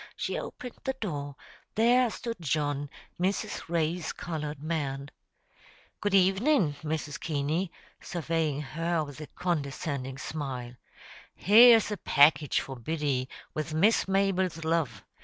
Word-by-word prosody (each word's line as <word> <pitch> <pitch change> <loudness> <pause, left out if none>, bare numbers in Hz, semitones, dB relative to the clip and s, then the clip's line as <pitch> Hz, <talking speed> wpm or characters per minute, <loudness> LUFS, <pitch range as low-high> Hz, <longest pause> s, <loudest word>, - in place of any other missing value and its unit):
She - - -3
opened 250 -1 -7
the 265 - -1
door; 145 -8 -4 0.4
there 240 +3 +4
stood 230 +1 -5
John, 145 -2 -1 0.3
Mrs. 185 -2 -1
Ray's 170 0 -1
colored 150 -4 -5
man. 145 -3 -3 0.9
"Good 205 -1 +1
evenin', 195 - +3
Mrs. 155 -1 -3
Keaney," 155 +4 -1 0.3
surveying 160 -4 -1
her 165 +4 -1
with 145 0 -9
a 155 - -7
condescending 140 -5 -3
smile. 130 -4 -5 0.6
"Here's 225 +2 +7
a 210 - -2
package 145 -2 +4
for 135 -1 -7
Biddy, 140 -1 -1 0.2
with 155 0 -3
Miss 205 +8 +3
Mabel's 190 -4 +1
love. 165 -1 0
160 Hz, 120 wpm, -29 LUFS, 145-190 Hz, 0.9 s, Here's